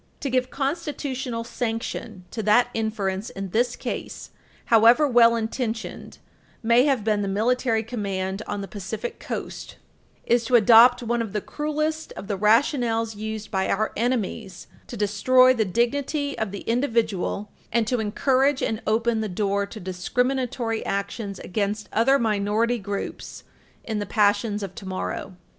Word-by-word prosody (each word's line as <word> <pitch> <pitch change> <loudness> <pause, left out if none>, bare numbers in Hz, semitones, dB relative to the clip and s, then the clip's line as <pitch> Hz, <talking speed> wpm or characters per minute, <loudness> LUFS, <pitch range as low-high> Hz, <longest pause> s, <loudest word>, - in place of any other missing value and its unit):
To 275 - -2
give 255 0 +1
constitutional 275 -5 -3
sanction 225 -4 -4
to 225 - -3
that 215 +4 +4
inference 210 -2 -2
in 195 -1 -6
this 240 +3 +1
case, - - -6 0.3
however 235 +6 +6
well 235 -2 +5
intentioned 225 0 -4 0.5
may 235 +3 +5
have 270 -7 +1
been 210 -1 +1
the 200 - -2
military 225 +3 +1
command 195 -4 -3
on 205 0 -3
the 195 - -6
Pacific 210 +4 -6
Coast, - - -6 0.5
is 240 0 +3
to 245 - +2
adopt 240 +2 +7
one 235 0 0
of 220 -4 -5
the 210 - 0
cruelest 305 +5 -3
of - - -8
the 205 - -1
rationales 225 +1 +2
used 215 0 -6
by 190 -1 0
our 215 +2 0
enemies 220 -5 -2 0.2
to - - -7
destroy 255 +6 +4
the 225 -4 0
dignity 280 - -1
of 220 -2 -2
the 200 +1 -7
individual 225 -5 -1 0.2
and 235 -1 +2
to 245 +2 0
encourage 260 +6 +1
and 220 0 -1
open 225 +1 +1
the 215 - -2
door 200 +1 -1
to 215 - -9
discriminatory 235 +5 -1
actions 200 0 -3
against 205 +2 -3
other 255 +6 +4
minority 220 +1 +1
groups 200 0 -6 0.4
in 220 -2 -3
the 205 - -4
passions 205 +1 +1
of 190 -2 -6
tomorrow. 190 0 -5
225 Hz, 150 wpm, -24 LUFS, 205-245 Hz, 0.5 s, adopt